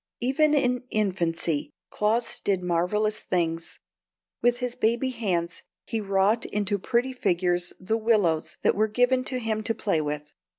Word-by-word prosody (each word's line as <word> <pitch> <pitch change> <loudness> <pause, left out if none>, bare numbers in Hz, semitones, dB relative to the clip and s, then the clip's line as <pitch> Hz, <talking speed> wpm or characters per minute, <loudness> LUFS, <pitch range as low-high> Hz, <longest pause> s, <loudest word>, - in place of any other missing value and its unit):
Even 295 +5 +3
in 250 -3 +2
infancy 170 -7 0 0.2
Claus 225 +3 0
did 190 -3 0
marvellous 180 +5 0
things. 165 -2 -2 0.6
With 240 0 +3
his 250 -1 -3
baby 240 +2 +1
hands 180 -7 -2 0.2
he 225 - -2
wrought 200 +3 +2
into 205 0 -1
pretty 240 +6 0
figures 175 -6 0
the 205 +4 0
willows 210 -8 +1
that - - +4
were 215 +2 +2
given 245 +4 +2
him 225 -5 -2
to 225 +1 -1
play 195 -7 0
with. 150 0 -4
210 Hz, 140 wpm, -26 LUFS, 180-240 Hz, 0.6 s, that